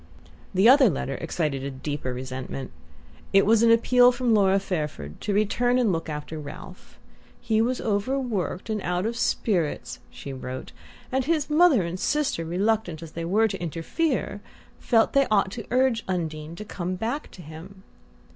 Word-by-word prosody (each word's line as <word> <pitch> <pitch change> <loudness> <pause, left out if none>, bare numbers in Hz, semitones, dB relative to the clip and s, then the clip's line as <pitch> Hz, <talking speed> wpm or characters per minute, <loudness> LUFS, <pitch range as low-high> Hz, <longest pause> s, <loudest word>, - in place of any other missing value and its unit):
The 195 +3 +4
other 265 -1 +7
letter 135 -4 -3
excited 150 -4 -2
a 140 - -3
deeper 135 0 -4
resentment. 130 +1 -6 0.6
It 195 0 +6
was 220 +1 +4
an 230 - +5
appeal 245 +2 +6
from 245 -1 0
Laura 195 -2 +4
Fairford 150 - -4
to - - -2
return 225 +5 +2
and 240 -5 +2
look 165 -1 -3
after 150 +1 -5
Ralph. 155 +5 -11 0.4
He 220 -2 +1
was 250 +2 0
overworked 215 - -2
and 215 -2 -2
out 180 +2 -1
of 230 +1 -2
spirits, 185 -8 -1
she 140 - -8
wrote, 130 0 -7 0.4
and 260 0 0
his 310 -1 0
mother 305 - +5
and 170 +2 -4
sister, 290 - 0
reluctant 180 -1 -1
as 160 - -10
they 165 +1 -5
were 215 +6 +3
to 195 -4 -5
interfere, 205 - -2 0.4
felt 225 -2 +2
they 275 -1 +4
ought 200 -3 +2
to 225 0 -7
urge 250 -2 +2
Undine 160 -3 -3
to 210 - -8
come 185 -2 -4
back 235 +10 -3
to 180 - -11
him. 170 +6 -11
195 Hz, 165 wpm, -25 LUFS, 160-235 Hz, 0.6 s, other